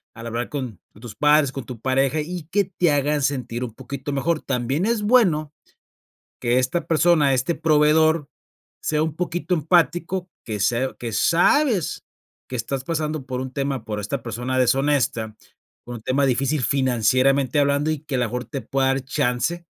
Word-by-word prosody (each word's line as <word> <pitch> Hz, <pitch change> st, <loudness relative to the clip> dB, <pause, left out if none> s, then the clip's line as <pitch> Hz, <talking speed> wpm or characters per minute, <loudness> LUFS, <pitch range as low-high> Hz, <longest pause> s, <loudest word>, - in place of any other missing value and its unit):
al 115 Hz, +1 st, -9 dB
hablar 115 Hz, +1 st, -3 dB
con 125 Hz, -, -5 dB
con 105 Hz, -, -19 dB
tus 120 Hz, -3 st, -8 dB
padres, 150 Hz, -2 st, +4 dB
con 135 Hz, -3 st, -6 dB
tu 125 Hz, -2 st, -8 dB
pareja, 135 Hz, +4 st, +1 dB
y 175 Hz, +1 st, -5 dB
que 205 Hz, 0 st, +3 dB
te 180 Hz, -3 st, +1 dB
hagan 145 Hz, +1 st, +1 dB
sentir 125 Hz, -3 st, -2 dB
un 120 Hz, -3 st, -6 dB
poquito 140 Hz, +3 st, -6 dB
mejor 155 Hz, +3 st, 0 dB
También 135 Hz, -, -1 dB
es 230 Hz, -2 st, 0 dB
bueno, 180 Hz, -, +3 dB, 0.9 s
que 120 Hz, +1 st, +2 dB
esta 130 Hz, +7 st, 0 dB
persona, 155 Hz, -4 st, +3 dB
este 130 Hz, +7 st, 0 dB
proveedor 155 Hz, 0 st, +3 dB, 0.5 s
sea 155 Hz, 0 st, 0 dB
un 160 Hz, -2 st, -3 dB
poquito 175 Hz, +1 st, -2 dB
empático, 175 Hz, +3 st, +1 dB, 0.2 s
que 105 Hz, -2 st, -4 dB
sea 120 Hz, +6 st, 0 dB
que 120 Hz, -1 st, -4 dB
sabes, 190 Hz, -, +2 dB, 0.5 s
que 130 Hz, -, -5 dB
estás 130 Hz, +2 st, -3 dB
pasando 155 Hz, -2 st, -3 dB
por 125 Hz, -1 st, -3 dB
un 130 Hz, 0 st, -5 dB
tema 135 Hz, -4 st, -2 dB
por 105 Hz, -1 st, -4 dB
esta 115 Hz, +5 st, -4 dB
persona 120 Hz, +3 st, -3 dB
deshonesta 125 Hz, -4 st, +1 dB, 0.5 s
con 120 Hz, -, -7 dB
un -, -, -12 dB
tema 135 Hz, +3 st, +1 dB
difícil 135 Hz, +2 st, 0 dB
financieramente 130 Hz, +2 st, +2 dB
hablando, 145 Hz, +2 st, +2 dB
y 155 Hz, -, -2 dB
que 145 Hz, -2 st, -5 dB
a -, -, +1 dB
lo 125 Hz, -, +2 dB
mejor 125 Hz, +2 st, -4 dB
te 140 Hz, -, -5 dB
pueda 135 Hz, -1 st, 0 dB
dar 135 Hz, 0 st, +1 dB
chance, 145 Hz, +4 st, -1 dB
140 Hz, 175 wpm, -22 LUFS, 125-155 Hz, 0.9 s, padres